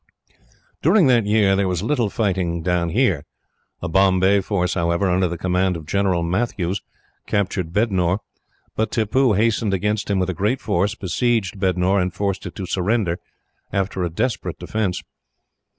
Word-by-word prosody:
"During 180 +3 +5
that 120 -5 +3
year 105 -2 +3
there 100 0 +1
was 90 0 -1
little 120 -3 +1
fighting 90 -6 -1
down 90 -1 0
here. 95 - +1 0.6
A - - -1
Bombay 95 +2 +3
force, 90 -2 -1
however, 85 +2 +1
under 90 +1 +2
the 85 0 -4
command 90 +1 0
of 80 - -10
General 95 0 +1
Matthews, 95 0 -1 0.5
captured 95 -4 -1
Bednore; 95 -3 +1 0.6
but 110 +1 0
Tippoo 115 +2 +2
hastened 110 -1 +1
against 105 +3 -1
him 100 - +1
with 95 0 0
a - - -5
great 105 +9 0
force, 100 +5 0
besieged 105 0 -1
Bednore, 95 +1 +2
and 90 0 -1
forced 100 +1 -2
it - - -9
to 95 - -5
surrender, 90 -1 0 0.5
after 95 -1 -1
a 85 - -1
desperate 115 +9 -2
defence. 105 -5 -2
95 Hz, 155 wpm, -21 LUFS, 90-105 Hz, 0.6 s, During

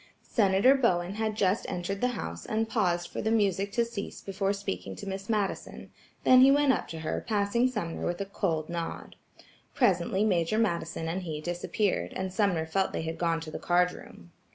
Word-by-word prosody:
Senator 200 +3 +5
Bowen 185 -9 +1
had 215 0 -2
just 200 0 +1
entered 190 +3 -3
the 250 - +3
house 85 +1 -5
and 220 +1 -1
paused 175 -7 0
for - - -5
the 220 - 0
music 200 -3 +1
to 235 - +2
cease 225 -4 -6
before 195 0 -1
speaking 95 - -4
to - - -8
Miss 195 +1 -5
Madison, 210 -3 -2 0.3
then 255 0 +7
he 265 - +8
went 285 -1 +5
up - - -2
to 160 -1 -7
her 155 - -2
passing 215 +3 +2
Sumner 210 -10 -4
with 175 0 -2
a 200 - -2
cold 165 -6 -1
nod. 170 -1 -5 0.6
Presently 200 +2 +2
Major 180 0 +1
Madison 170 -6 -1
and 175 +4 -2
he 160 -4 -4
disappeared, 175 +5 -1
and 190 -1 -3
Sumner 185 -6 +1
felt 190 +4 0
they - - -2
had 160 0 -4
gone 165 -1 +1
to 160 -1 -7
the - - -5
card 180 0 +3
room. 85 - -13
190 Hz, 195 wpm, -29 LUFS, 170-215 Hz, 0.6 s, he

